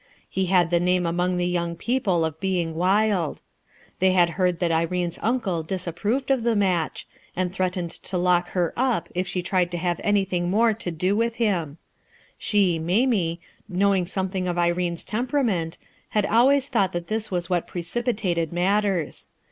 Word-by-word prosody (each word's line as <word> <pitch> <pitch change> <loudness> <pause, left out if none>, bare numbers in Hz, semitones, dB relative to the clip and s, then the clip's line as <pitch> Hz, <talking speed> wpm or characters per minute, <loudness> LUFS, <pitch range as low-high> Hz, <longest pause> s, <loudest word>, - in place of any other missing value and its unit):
He 190 -1 -1
had 175 -2 +3
the 170 - +3
name 180 0 +2
among 180 +2 0
the 175 - 0
young 170 -1 -1
people 195 -5 0
of 160 -1 -4
being 175 -3 -1
wild. 185 0 +1 0.6
They 185 0 +4
had 175 -2 +4
heard 180 0 +1
that 170 -1 0
Irene's 170 +1 -1
uncle 215 -8 0
disapproved 190 - -2
of 265 -3 +2
the 230 0 +1
match, 185 -6 0 0.3
and 180 0 -1
threatened 185 -2 -1
to 185 - -5
lock 175 0 +2
her 175 -2 +1
up 245 -8 0
if 180 +1 -1
she 180 -1 -2
tried 180 -1 +1
to 175 - -4
have 175 0 -1
anything 190 -4 +1
more 225 +4 +3
to 210 -4 -5
do 180 +4 0
with 230 +1 0
him 175 -10 -1 0.6
She, 190 -6 +2
Mamie, 180 -1 +1 0.3
knowing 190 -1 +2
something 190 -1 -2
of 175 -1 -2
Irene's 175 0 0
temperament, 220 - -1 0.3
had 210 -2 +1
always 265 +6 +4
thought 205 -9 +1
that 175 0 -3
this 215 +2 -2
was 175 -2 -2
what 175 -1 -1
precipi 240 +8 -2 0.2
tated 165 -2 -1
matters. 190 -1 0
180 Hz, 170 wpm, -24 LUFS, 175-205 Hz, 0.6 s, They